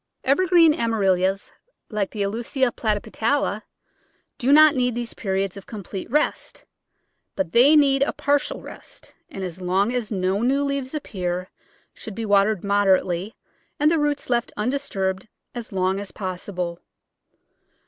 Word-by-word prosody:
Evergreen 335 +2 +4
Amaryllis, 195 - 0 0.4
like 210 -3 -1
the 205 - -3
Aulica 240 +5 -1
platypetala, 220 +2 -1 0.8
do 260 +2 +2
not 305 0 +8
need 250 -2 0
these 240 -1 -4
periods 195 -2 -2
of 195 - -11
complete 200 -2 -7
rest, 300 +5 -1 0.7
but 190 -4 -2
they 265 +6 +6
need 275 -2 +4
a 275 - +2
partial 285 +1 -1
rest, - - -12 0.2
and 195 - -7
as 180 0 -6
long 190 +6 +1
as 240 -4 -3
no 190 0 0
new 270 +4 +2
leaves 280 0 -3
appear 185 -9 -4 0.4
should 215 - -9
be 225 - -4
watered 205 -1 +2
mod 200 0 +1
erately 185 +2 +1 0.5
and 300 +2 +4
the 330 - +2
roots 295 -1 -1
left 240 -1 0
undisturbed 210 -6 -2 0.3
as 240 -2 -7
long 190 0 0
as 200 -2 -7
pos 185 -2 -5
sible. 175 -3 -4
215 Hz, 145 wpm, -23 LUFS, 190-270 Hz, 0.8 s, not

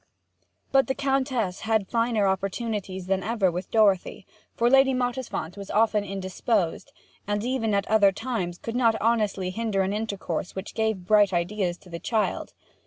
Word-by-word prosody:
But 270 -1 +4
the 265 - -1
Countess 265 -8 0
had 220 -3 0
finer 230 -3 +1
opportunities 195 -1 -2
than 190 0 0
ever 200 -2 +1
with 180 +2 -5
Dorothy; 205 -5 +2 0.3
for 235 - +2
Lady 270 +1 +5
Mottisfont 245 -9 -3
was 200 -1 -8
often 215 -1 +2
indisposed, 195 -1 -2 0.4
and 205 0 -1
even 235 -4 0
at 200 0 +1
other 205 -2 +5
times 195 -5 -3
could 230 +4 -6
not 230 -3 +3
honestly 210 -5 +1
hinder 215 -2 0
an 190 +1 -1
intercourse 200 -6 -3
which 190 +1 -6
gave 220 -5 -1
bright 205 -1 +4
ideas 175 0 -1
to 180 - -18
the 170 - -5
child. 220 +2 -1
210 Hz, 160 wpm, -26 LUFS, 190-230 Hz, 0.4 s, Lady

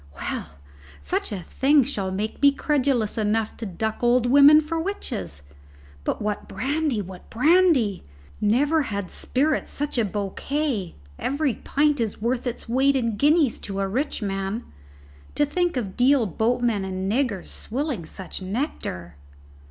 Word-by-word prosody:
"Well, 75 - -4 0.5
such 70 - -2
a 190 -4 -4
thing 280 - +3
shall 210 -7 -3
make 205 +3 -3
me 285 0 +7
credulous 270 -7 0
enough 215 +1 0
to 225 - -5
duck 220 +4 -3
old 240 0 +3
women 285 +4 +8
for 320 +2 -2
witches. 95 - -4 0.6
But - - -1
what 210 -1 -3
brandy 275 -4 -1
what 185 0 -11
brandy! 295 - +3 0.4
Never 285 +10 +3
had 200 -3 -4
spirit 295 +4 0
such 290 -3 -3
a - - +3
bouquet. 210 - -2 0.2
Every 280 -1 0
pint 295 +3 +1
is 225 -3 -2
worth 240 +3 -1
its 245 - -5
weight 265 +4 +3
in 230 -4 0
guineas 295 +1 +3
to 195 -1 -5
a 195 - 0
rich 255 +4 -2
man. 195 +3 -2 0.7
To 295 - +3
think 350 +1 0
of 195 -6 -3
Deal 255 0 +4
boatmen 225 +1 0
and 190 0 -3
niggers 235 -6 -1
swilling 260 - -3
such 190 +2 -8
nectar!" 185 - -4
240 Hz, 145 wpm, -24 LUFS, 200-285 Hz, 0.7 s, women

